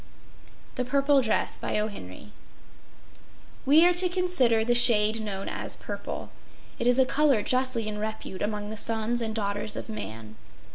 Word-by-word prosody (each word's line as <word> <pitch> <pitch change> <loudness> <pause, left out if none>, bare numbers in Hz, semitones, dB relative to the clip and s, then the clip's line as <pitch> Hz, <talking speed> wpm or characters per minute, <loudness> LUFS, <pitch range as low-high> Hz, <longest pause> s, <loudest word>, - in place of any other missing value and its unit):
THE 250 - 0
PURPLE 275 +2 +2
DRESS 225 -3 -2 2.1
We 310 +5 +6
are 355 - +4
to 360 +1 +4
consider 310 -12 +1
the 240 - +2
shade 225 -2 +4
known 195 -2 -5
as - - -2
purple. - - -7 0.5
It 235 - -1
is 245 0 +3
a 265 - +4
color 275 -5 +2
justly 255 -3 0
in 210 -1 -5
repute 215 -3 -6
among 210 0 -3
the 220 - -7
sons 225 +2 +2
and 220 -1 -3
daughters 205 0 -3
of - - -7
man. 110 - -8
225 Hz, 145 wpm, -26 LUFS, 210-260 Hz, 2.1 s, We